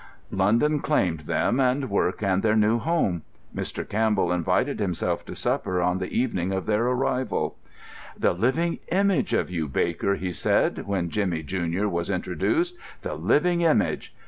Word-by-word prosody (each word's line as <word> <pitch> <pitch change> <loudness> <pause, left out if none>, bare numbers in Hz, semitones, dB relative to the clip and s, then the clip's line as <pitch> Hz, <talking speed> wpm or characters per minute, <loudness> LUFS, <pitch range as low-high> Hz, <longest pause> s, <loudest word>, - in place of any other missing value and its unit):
London 115 +11 +2
claimed 90 - +1
them, 120 - +1
and 130 +1 +2
work 100 -1 0
and 95 -1 +2
their 110 -1 +2
new 110 +2 +3
home. 140 - 0 0.3
Mr. - - -4
Campbell 105 -4 +1
invited 90 -2 0
himself - - -1
to - - -8
supper 90 -1 -1
on 90 +1 +1
the 95 - -3
evening 95 -7 0
of 95 -1 -2
their 110 +2 +1
arrival. 125 0 0 0.6
"The - - +2
living 130 - 0
image 195 -6 +1
of - - 0
you, 80 -4 -2
Baker," 85 +7 0
he 90 -1 -3
said, 90 - 0
when 90 -4 -1
Jimmy, 90 -6 -1
junior, 90 +4 -1
was 85 -2 -2
introduced, 335 - 0 0.3
"the - - -3
living 175 +3 +2
image!" 165 -2 +1
105 Hz, 155 wpm, -25 LUFS, 90-130 Hz, 0.6 s, new